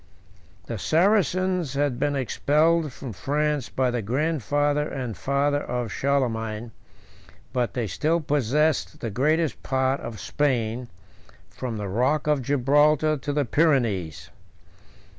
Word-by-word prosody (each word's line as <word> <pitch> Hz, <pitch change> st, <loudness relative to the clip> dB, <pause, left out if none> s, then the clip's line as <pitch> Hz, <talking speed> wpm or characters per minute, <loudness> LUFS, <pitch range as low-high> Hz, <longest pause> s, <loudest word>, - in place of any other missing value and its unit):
II. 95 Hz, -2 st, -30 dB, 0.2 s
The 115 Hz, -, -5 dB
Saracens 185 Hz, -, +2 dB
had 140 Hz, -3 st, 0 dB
been 145 Hz, -1 st, 0 dB
expelled 150 Hz, +4 st, +2 dB
from 125 Hz, -2 st, -8 dB
France 150 Hz, +4 st, -1 dB
by 130 Hz, -1 st, 0 dB
the 120 Hz, -1 st, -1 dB
grandfather 145 Hz, +4 st, 0 dB
and 125 Hz, -5 st, -4 dB
father 145 Hz, +1 st, 0 dB
of 120 Hz, -3 st, -3 dB
Charlemagne; 115 Hz, -4 st, -1 dB, 0.8 s
but 125 Hz, -2 st, -1 dB
they 120 Hz, -3 st, -1 dB
still 155 Hz, -, 0 dB
possessed 150 Hz, +1 st, 0 dB
the 115 Hz, -, -3 dB
greatest 155 Hz, +6 st, +1 dB
part 130 Hz, +1 st, 0 dB
of 110 Hz, -2 st, -7 dB
Spain, 125 Hz, -4 st, -1 dB, 0.6 s
from 115 Hz, +2 st, -5 dB
the 105 Hz, -1 st, -4 dB
rock 125 Hz, +10 st, +1 dB
of 150 Hz, -2 st, +2 dB
Gibraltar 145 Hz, +4 st, +3 dB
to 140 Hz, +2 st, -4 dB
the 145 Hz, -1 st, 0 dB
Pyrenees. 105 Hz, -, +1 dB
140 Hz, 125 wpm, -25 LUFS, 120-150 Hz, 0.8 s, Gibraltar